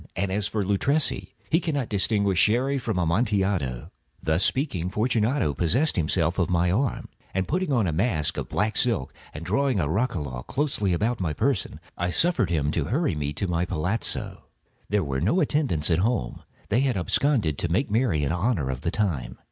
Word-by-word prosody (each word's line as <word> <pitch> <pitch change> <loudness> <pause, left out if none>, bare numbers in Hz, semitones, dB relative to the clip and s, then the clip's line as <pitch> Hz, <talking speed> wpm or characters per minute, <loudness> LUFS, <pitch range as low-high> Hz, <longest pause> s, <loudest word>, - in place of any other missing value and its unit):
And 100 -1 -1
as 100 +1 0
for 105 -2 -1
Luchesi, 135 +10 0 0.2
he 165 - +4
cannot 145 -8 -1
distinguish 100 -2 +1
Sherry 130 +8 +3
from 110 - -2
Amontillado." 90 - 0 0.3
Thus 80 +4 +1
speaking, 115 - 0
Fortunato 110 - +1
possessed 110 - +1
himself 85 0 0
of 90 - +1
my 90 0 +2
arm. 125 +7 -1 0.4
Putting 180 - -1
on 120 -6 +2
a 85 - 0
mask 85 - 0
of - - -4
black 105 +2 0
silk, 115 - +1 0.2
and 75 +3 -8
drawing 135 -3 +1
a 75 - +1
roquelaire 75 - -2
closely 130 - -1
about 110 +7 0
my 85 -5 -1
person, 110 - -1 0.2
I 90 +1 0
suffered 125 - +2
him 75 -4 0
to 80 -3 -1
hurry 145 - 0
me 75 -1 -2
to 95 +6 -2
my 85 -1 0
palazzo. 90 +4 -2 0.4
There 105 -1 +1
were 65 -2 -2
no 110 - +2
attendants 135 - +1
at 80 - +3
home; 95 - -1 0.3
they 110 +4 +2
had 130 -5 +1
absconded 95 - +1
to 85 - -2
make 105 +6 0
merry 105 - +2
in 70 - 0
honor 90 - 0
of 65 0 -5
the 85 - -1
time. 90 - -2
100 Hz, 180 wpm, -25 LUFS, 80-125 Hz, 0.4 s, he